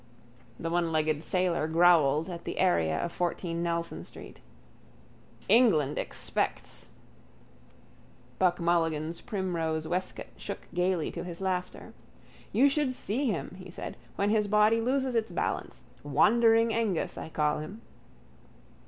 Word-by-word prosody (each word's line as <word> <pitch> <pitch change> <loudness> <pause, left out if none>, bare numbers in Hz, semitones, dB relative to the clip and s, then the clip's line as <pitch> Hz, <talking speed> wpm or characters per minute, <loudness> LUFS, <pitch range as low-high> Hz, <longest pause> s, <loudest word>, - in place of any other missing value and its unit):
The 165 - -3
onelegged 155 -3 +1
sailor 175 -2 0
growled 160 -2 +4
at 170 -2 -7
the - - -5
area 80 -2 +2
of 170 - -2
14 170 -1 -2
Nelson 170 - -2
street: - - -12 1.1
—England 190 - +4
expects... - - -3 1.5
Buck 180 -1 +3
Mulligan's 165 -1 0
primrose 165 -6 -2
waistcoat 180 +3 -3
shook - - -7
gaily 180 -2 0
to - - -5
his 175 -2 -7
laughter. 185 -1 -3 0.6
—You 275 - +5
should 280 -2 +1
see 255 +7 -2
him, 185 -3 -3
he 185 - -10
said, - - -7 0.2
when 200 +1 +1
his 215 -1 +2
body 215 +2 +4
loses 260 +2 0
its 225 -4 0
balance. 170 - -3 0.2
Wandering 225 - +4
Ængus 225 -6 -1
I - - -7
call 150 -1 0
him. 195 +9 -8
175 Hz, 125 wpm, -29 LUFS, 160-210 Hz, 1.5 s, You